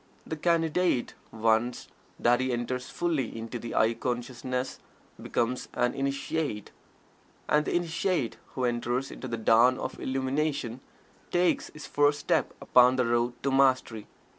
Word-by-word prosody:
The 160 - -4
Candidate, 165 -3 +1 0.2
once 115 +2 +1 0.3
that 120 +1 +4
he 130 0 0
enters 125 +1 -3
fully 155 -10 -1
into 115 +2 -5
the 115 0 -6
"I" 110 +1 +4
consciousness, 125 +2 -3 0.4
becomes 125 +2 -1
an 120 - +1
"Initiate." 140 -3 -2 0.8
And 150 0 +3
the - - -1
Initiate 175 - 0 0.2
who 130 - 0
enters 120 +2 -1
into 130 - -7
the 115 -1 -3
dawn 115 +3 +5
of - - -5
Illumination 135 -1 -1 0.5
takes 175 0 +2
his 150 - -10
first 145 0 +2
step - - 0
upon 125 +1 +5
the 125 -1 +2
road 120 +1 +1
to 140 - +1
Mastery. 130 -5 +2
130 Hz, 140 wpm, -28 LUFS, 120-145 Hz, 0.8 s, dawn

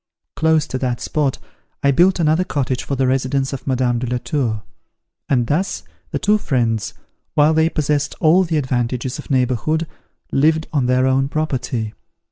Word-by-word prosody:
Close 160 -1 +2
to 130 - -4
that 125 -2 -1
spot 145 -4 -1 0.5
I 140 - +5
built 175 +7 +4
another 160 +2 +3
cottage 135 -8 -2
for 140 - -2
the 135 0 +1
residence 135 +1 0
of 135 - -7
Madame 125 -2 +1
de 125 - -3
la 125 +1 -1
Tour; 120 -4 -2 0.7
and 125 -4 +2
thus 150 - -1 0.3
the - - -2
two 210 +1 +2
friends, 115 - -1 0.4
while 150 +2 +5
they 160 +1 +3
possessed 150 -2 -1
all 170 +4 +5
the 165 -3 -1
advantages 125 -2 -1
of - - -9
neighbourhood 130 +5 +1 0.5
lived 155 +3 +2
on 135 -5 +1
their 125 +1 +3
own 135 +1 +2
property. 125 -7 -2
135 Hz, 165 wpm, -19 LUFS, 125-155 Hz, 0.7 s, I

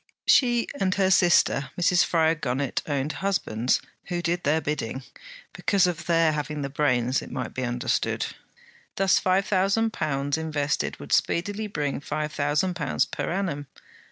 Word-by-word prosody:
She 240 -3 +4
and 185 -1 +1
her 190 -1 +2
sister 175 -6 +4
Mrs. 175 0 +4
Fryar 160 -1 +2
Gunnett 135 -3 -2
owned 145 0 -1
husbands 130 - 0 0.3
who 175 -2 -3
did 175 +1 0
their 155 +3 +2
bidding, 140 -4 -3 0.5
because 200 -2 +2
of 175 -3 -3
their 165 -2 +4
having 150 -1 -3
the 140 - -4
brains, 130 -3 +1
it - - -9
might 130 0 -5
be 130 - -4
understood. 120 -1 -1 0.7
Thus 195 -1 +3
five 190 +1 +2
thousand 205 +3 +1
pounds 145 0 -1
invested 150 -2 -2
would - - -4
speedily 205 +5 0
bring 145 -8 -2
five 150 +1 -4
thousand 150 +5 0
pounds 150 -5 0
per 145 - -4
annum. 170 -7 -2
155 Hz, 155 wpm, -25 LUFS, 140-185 Hz, 0.7 s, She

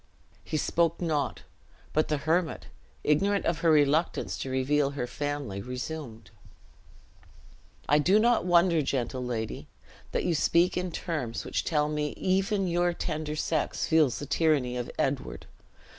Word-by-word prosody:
He 155 - -2
spoke 165 +2 +1
not; 150 - -1 0.5
but 155 - +2
the 150 - 0
hermit, 160 +4 0 0.4
ignorant 195 +7 +2
of 170 -1 0
her 165 - +2
reluctance 150 +2 +2
to 135 - -4
reveal 135 +2 +1
her 140 -3 -3
family, 140 -6 -4
resumed: 125 -1 -6 1.6
"I 145 +2 +4
do 185 +8 +4
not 235 +1 +3
wonder, 175 -2 +4
gentle 130 -2 -2
lady, 115 -3 -4 0.4
that - - -1
you 175 - +2
speak 170 +3 +3
in 180 0 -2
terms 150 -9 -4
which - - -1
tell 150 -2 +1
me 150 -1 -2
even 195 +1 +1
your 175 0 +1
tender 155 -3 -3
sex 155 0 -1
feels 155 -6 +3
the 145 - -5
tyranny 145 -5 +1
of 125 -1 -3
Edward. 135 - -2
150 Hz, 145 wpm, -28 LUFS, 135-170 Hz, 1.6 s, I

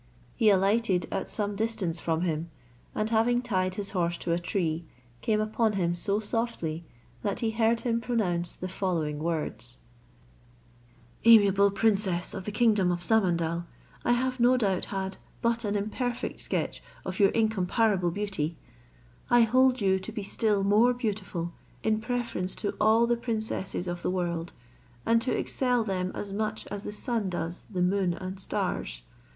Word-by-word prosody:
He 220 - +4
alighted 195 -1 +3
at - - -2
some 205 -1 -2
distance 200 -6 -1
from 165 -1 -1
him, 165 -1 -1 0.5
and 215 - 0
having 240 +2 +3
tied 185 -5 0
his 200 0 -4
horse 175 -3 0
to 170 - -3
a 170 - +2
tree, 170 -2 -1 0.4
came 215 -1 +1
upon 215 +1 +1
him 175 -3 +1
so 200 +4 0
softly, 210 -8 -2 0.4
that 200 +3 -2
he 225 -2 +1
heard 225 +1 +2
him 235 -1 0
pronounce 185 -8 0
the 185 - -5
following 170 -6 -1
words: 150 -8 -3 1.5
"Amiable 200 -3 +7
princess 195 -4 +1
of 190 -2 -6
the 210 - -3
kingdom 210 -4 +3
of 175 0 -3
Samandal, 170 -5 +1 0.4
I 240 - +3
have 255 +1 0
no 245 +2 +5
doubt 195 -6 +1
had 190 -1 -4 0.2
but 235 0 +1
an 205 -1 -1
imperfect 235 +4 -2
sketch - - -2 0.2
of - - -4
your 200 -1 +6
incomparable 215 -3 +2
beauty; 170 -4 -3 0.7
I 240 0 +6
hold 255 +2 +4
you 190 -1 +3
to 190 - -7
be 210 -2 -4
still 205 0 +1
more 220 +5 +4
beautiful 195 -7 -3 0.3
in 220 0 +1
preference 230 -6 -2
to 205 - -2
all 220 +2 +5
the 240 0 +1
princesses 220 -6 -3
in 175 - -1
the - - -1
world, 175 -2 -2 0.5
and 230 0 +4
to 255 - 0
excel 250 -3 +1
them 185 -3 -2
as 200 -1 -5
much 215 +1 -2
as 205 -1 -4
the - - -3
sun 215 -1 -1
does 175 0 -4
the 185 -4 0
moon 185 -1 +1
and 185 +2 -6
stars. - - -3
200 Hz, 160 wpm, -28 LUFS, 180-225 Hz, 1.5 s, Amiable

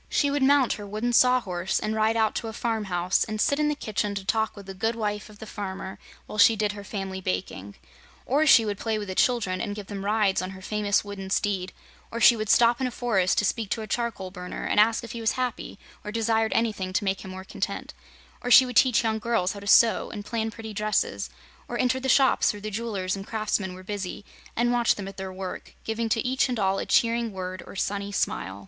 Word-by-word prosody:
She 285 -1 +2
would 285 0 0
mount 275 -1 +4
her 205 -1 -7
Wooden 215 +4 -2
Sawhorse, 205 -8 +2
and 215 - -2
ride 220 +1 +2
out 220 -1 +2
to 230 - -4
a 220 - -6
farm 225 -2 -2
house 180 -1 +1
and 215 0 -4
sit 280 +4 +2
in 300 - +2
the 300 - 0
kitchen 210 -5 -2
to 195 -1 -5
talk 220 +2 0
with 200 -2 -11
the 195 - -7
good 225 +5 -1
wife 210 -2 -3
of 210 - -14
the 220 - -9
farmer 190 -2 -6 0.3
while 215 - -7
she 225 +2 +7
did 210 -1 0
her 205 0 -9
family 195 -2 -5
baking; 95 - -4 0.5
or 295 +5 +2
she 230 -5 +7
would 205 -1 -3
play 225 -1 -1
with 210 -1 -5
the - - -2
children 195 -4 +1
and 205 -3 -3
give 210 -1 -7
them 195 0 -6
rides 205 -1 +2
on 185 - -4
her - - -12
famous 205 0 0
wooden 195 -2 -7
steed; 190 -2 -1 0.4
or 230 - -5
she 235 - +7
would 215 -2 -4
stop 235 +2 +4
in 260 - +1
a - - -2
forest 220 -7 +1
to 210 - +3
speak 220 -1 -1
to 220 - -2
a - - -7
charcoal 220 -5 -3
burner 180 -1 -6
and - - +2
ask 225 +2 +4
if 235 - -7
he 235 - -6
was 225 - +1
happy 250 -5 -3 0.3
or 210 - -5
desired 225 0 +1
anything 210 -5 0
to 185 - +1
make 195 0 -1
him 190 - -8
more 185 0 -7
content; - - -4 0.5
or 245 - -3
she 260 +1 +9
would 250 -2 -3
teach 250 -3 +5
young 220 -1 0
girls 220 -5 0
how 200 - -8
to 200 - -10
sew 230 +2 +5
and 205 -1 -7
plan 225 -1 -2
pretty 220 0 -8
dresses, 210 +1 -1 0.4
or - - -4
enter 255 +1 +1
the 265 0 -3
shops 265 +1 +4
where 205 - -9
the 215 +1 -6
jewelers 200 -4 -2
and 195 0 -8
craftsmen 210 -4 -2
were 185 - -11
busy 200 0 -5 0.3
and 240 +1 +2
watch 240 -1 +3
them 200 -2 -6
at 195 - -9
their 190 -1 -5
work, 185 0 -7
giving 225 +1 -2
to 225 +1 0
each 260 +1 +1
and 245 - -1
all 195 -1 +1
a - - -4
cheering 230 -1 +2
word 185 -1 -5
or - - -10
sunny 200 +1 -2
smile. 95 - -2
215 Hz, 245 wpm, -26 LUFS, 195-230 Hz, 0.5 s, she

